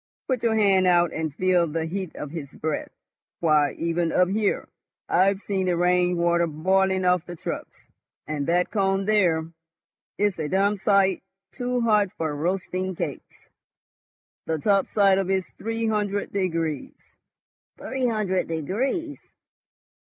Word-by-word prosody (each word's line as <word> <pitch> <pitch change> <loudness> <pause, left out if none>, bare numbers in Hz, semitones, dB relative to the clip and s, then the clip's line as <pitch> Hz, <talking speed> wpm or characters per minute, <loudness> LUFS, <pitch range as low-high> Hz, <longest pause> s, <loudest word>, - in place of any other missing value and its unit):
Put 255 -3 0
your 230 -2 +2
hand 195 -3 +4
out 175 -2 +3
and 160 -1 -2
feel 180 -1 +2
the 160 +1 -2
heat 185 +1 -5
of 150 - -6
his 155 -4 -6
breath. 155 +2 -4 0.5
Why, 155 -3 +3
even 170 0 -1
up 180 0 +3
here 210 +1 0 0.4
I've 195 +2 +3
seen 190 -2 -1
the 175 -1 +1
rain 180 0 +2
water 170 0 +2
boiling 190 +4 +1
off 180 -1 +2
the 175 - -7
trucks. - - -7 0.3
And 150 -2 -3
that 175 +1 +1
cone 195 -2 +1
there. 185 -7 +3 0.7
It's 205 -4 0
a 155 - -1
damned 200 +2 +1
sight 195 -2 +3 0.3
too 250 -1 -2
hot 210 -4 +3
for 155 -2 -3
roasting 185 +3 -2
cakes. - - -6 1.0
The 160 - 0
top 195 +5 +2
side 195 -2 +3
of 190 -1 -2
it's 190 -1 -1
three 225 +1 -2
hundred 205 -2 -1
degrees." 180 - -2 0.8
"Three 260 -1 -2
hundred 205 -5 0
degrees!" 255 - -2
185 Hz, 145 wpm, -25 LUFS, 170-205 Hz, 1.0 s, hand